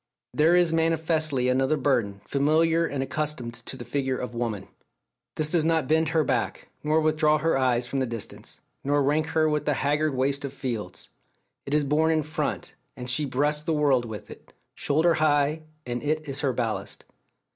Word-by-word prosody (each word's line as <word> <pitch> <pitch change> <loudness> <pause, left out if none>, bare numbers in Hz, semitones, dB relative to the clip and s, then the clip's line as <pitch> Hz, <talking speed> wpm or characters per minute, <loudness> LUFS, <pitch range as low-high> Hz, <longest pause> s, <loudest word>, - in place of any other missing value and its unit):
There 160 +3 +4
is 175 -2 +3
manifestly 160 -4 +1
another 130 +4 +2
burden, 115 -8 0
familiar 160 +4 +2
and 135 -2 -2
accustomed 135 -3 -3
to 130 - -6
the 120 - -8
figure 135 -2 -1
of 125 -1 -5
woman. 115 -5 -3 0.7
This 155 0 -1
does 170 -3 +3
not 160 -3 +1
bend 160 0 +2
her 160 -2 +2
back, - - -2
nor 155 +1 +2
withdraw 155 -1 +3
her 165 +2 +1
eyes 125 -2 +1
from 135 +2 -2
the 130 - 0
distance, 115 -2 -8 0.2
nor 145 +1 +2
rank 150 +3 +1
her 160 -1 +2
with 150 -1 0
the 150 - +1
haggard 150 +1 0
waste 135 +2 0
of 140 -1 -5
fields. 110 -10 -5 0.6
It 140 - 0
is 150 - +3
borne 150 +3 +2
in 160 -1 +2
front, 155 +1 -3 0.2
and 125 0 -5
she 150 +4 0
breasts 145 +3 +1
the 160 +1 -1
world 140 -5 +2
with 110 -3 -8
it; - - -14 0.2
shoulder 160 +4 +2
high, 150 0 +2 0.2
and 120 0 -3
it 155 +1 -1
is 140 0 -4
her 140 -3 +1
ballast. 115 -3 -3
145 Hz, 185 wpm, -26 LUFS, 130-155 Hz, 0.7 s, There